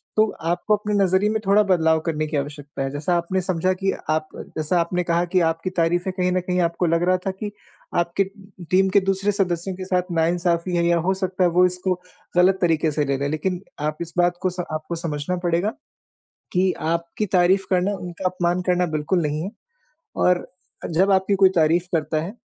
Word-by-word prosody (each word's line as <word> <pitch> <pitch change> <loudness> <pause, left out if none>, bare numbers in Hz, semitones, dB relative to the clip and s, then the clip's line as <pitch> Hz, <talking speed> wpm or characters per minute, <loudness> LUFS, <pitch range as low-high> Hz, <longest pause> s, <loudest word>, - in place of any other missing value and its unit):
तो 215 - +5 0.2
आपको 175 +5 +1
अपने 210 0 -3
नज़रिए 190 +2 +2
में 220 0 0
थोड़ा 200 +2 +5
बदलाव 160 -5 +3
करने 155 -2 -1
की 150 -1 -2
आवश्यकता 145 0 -5
है, 135 - -2
जैसा 150 +5 -1
आपने 180 +2 -1
समझा 185 0 0
कि 195 +1 -1 0.2
आप 155 0 +1
जैसा 155 +3 -2
आपने 175 +1 0
कहा 170 0 +1
कि 185 +1 +1
आपकी 165 +3 -3
तारीफें 175 +1 0
कहीं 180 -1 0
न 185 - +2
कहीं 180 0 -1
आपको 170 +1 0
लग 165 0 +2
रहा 185 - +4
था 195 - 0
कि 205 +2 -6 0.5
आपके 170 +3 +1 0.5
टीम 190 +1 +4
के 200 - +7
दूसरे 195 +1 +1
सदस्यों 185 -2 -1
के 185 0 -6
साथ 185 -1 +1
नाइंसाफी 170 +1 +1
है 170 0 +2
या 170 0 +3
हो 175 +3 +1
सकता 185 -1 -1
है 175 - +4
वो 180 +2 +4
इसको 180 +1 0 0.4
गलत 185 +2 +5
तरीके 165 -2 +2
से 150 0 0
ले 140 0 0
रहे 135 - -3
हैं, 140 - -1
लेकिन 175 +4 -2 0.2
आप 150 +1 -2
इस 170 -1 -6
बात 175 0 +2
को 185 - +1
स 180 0 -9
आपको 155 +2 -4
समझना 165 0 -3
पड़ेगा 175 +5 +1 0.8
कि 185 +1 +2
आपकी 170 +5 -2
तारीफ 185 +1 +3
करना 185 +2 +2
उनका 180 0 -8
अपमान 180 0 0
करना 180 0 +2
बिल्कुल 160 +4 0
नहीं 150 0 -1
है 190 - -4 0.7
और 180 -1 +2 0.5
जब 190 +5 +3
आपकी 190 +1 +3
कोई 190 - +8
तारीफ 170 +2 +3
करता 155 0 0
है 185 +5 -6
175 Hz, 205 wpm, -22 LUFS, 165-185 Hz, 0.8 s, कोई